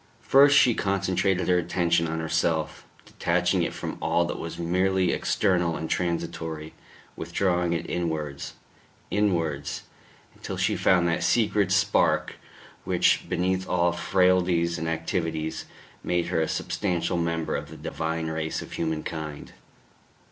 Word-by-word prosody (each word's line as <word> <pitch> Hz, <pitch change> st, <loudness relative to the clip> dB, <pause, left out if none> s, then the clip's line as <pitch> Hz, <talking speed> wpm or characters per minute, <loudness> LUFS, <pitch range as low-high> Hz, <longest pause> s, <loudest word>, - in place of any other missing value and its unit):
First 140 Hz, +1 st, +6 dB
she 125 Hz, -5 st, +6 dB
concentrated 95 Hz, -2 st, 0 dB
her 90 Hz, -1 st, +4 dB
attention 85 Hz, -1 st, +1 dB
on 80 Hz, 0 st, -3 dB
herself, 80 Hz, 0 st, -1 dB, 0.2 s
detaching -, -, 0 dB
it -, -, 0 dB
from -, -, -6 dB
all 85 Hz, -, +2 dB
that 85 Hz, -, -4 dB
was 85 Hz, -, -6 dB
merely 90 Hz, +2 st, +1 dB
external 90 Hz, -4 st, +1 dB
and 80 Hz, -, -4 dB
transitory, 80 Hz, -3 st, -3 dB, 0.4 s
withdrawing 85 Hz, 0 st, 0 dB
it 85 Hz, -, -3 dB
inwards... 80 Hz, -5 st, -3 dB, 0.6 s
inwards, 85 Hz, -9 st, -1 dB, 0.5 s
until -, -, -7 dB
she -, -, +1 dB
found 90 Hz, -2 st, +3 dB
that 85 Hz, -, 0 dB
secret 105 Hz, -4 st, +2 dB
spark -, -, +2 dB, 0.5 s
which, -, -, +2 dB
beneath 95 Hz, +1 st, -1 dB
all 85 Hz, -1 st, +2 dB
frailties 90 Hz, -1 st, +2 dB
and 80 Hz, +1 st, -2 dB
activities, 80 Hz, -1 st, -2 dB, 0.4 s
made 90 Hz, -1 st, 0 dB
her 80 Hz, -, +1 dB
a 80 Hz, -, 0 dB
substantial 90 Hz, -3 st, -1 dB
member 85 Hz, -1 st, -1 dB
of -, -, -4 dB
the -, -, -10 dB
divine 80 Hz, 0 st, -3 dB
race 80 Hz, 0 st, -3 dB
of -, -, -12 dB
humankind. 80 Hz, -2 st, -4 dB
85 Hz, 130 wpm, -26 LUFS, 80-90 Hz, 0.6 s, First